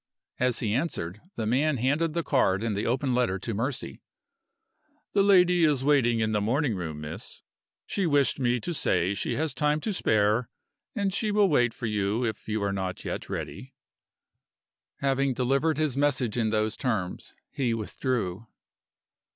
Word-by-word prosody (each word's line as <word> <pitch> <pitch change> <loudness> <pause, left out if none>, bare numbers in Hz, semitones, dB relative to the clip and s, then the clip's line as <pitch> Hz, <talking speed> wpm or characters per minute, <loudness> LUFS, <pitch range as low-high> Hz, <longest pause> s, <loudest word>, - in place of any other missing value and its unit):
As 125 -1 +1
he 105 -4 0
answered, 110 - -2
the 110 - -2
man 135 +6 +2
handed 145 +6 +1
the 170 - 0
card 110 -9 +2
and 115 -3 -1
the 105 - -2
open 130 +2 0
letter 120 -6 +1
to 110 +4 -4
Mercy. 120 +6 -3 1.1
"The 200 - +4
lady 180 -3 +5
is 145 -4 +3
waiting 125 -5 +3
in 110 0 +1
the 105 -1 +1
morning 125 +4 +1
room, 80 -5 -5
miss. 75 +1 -8 0.4
She 195 -3 -1
wished 145 -2 +2
me 125 -1 +1
to 175 - -3
say 90 - +1
she - - -2
has 155 -2 -1
time 150 +2 +1
to 210 - -2
spare, 110 - +2 0.5
and 200 -3 0
she 215 +2 0
will 205 -1 +3
wait 120 -6 +3
for 115 - -7
you 105 +2 0
if 110 - -4
you 110 -1 -1
are 100 0 0
not 95 -2 -4 0.3
ready - - -4
yet." - - -12 1.4
Having 135 -1 +1
delivered 135 +5 +1
his 155 -4 0
message 135 -5 +1
in 115 -3 +1
those 110 0 0
terms, 105 -8 -3 0.2
he 130 -4 -1
withdrew. 110 -2 -3
125 Hz, 165 wpm, -27 LUFS, 110-145 Hz, 1.4 s, lady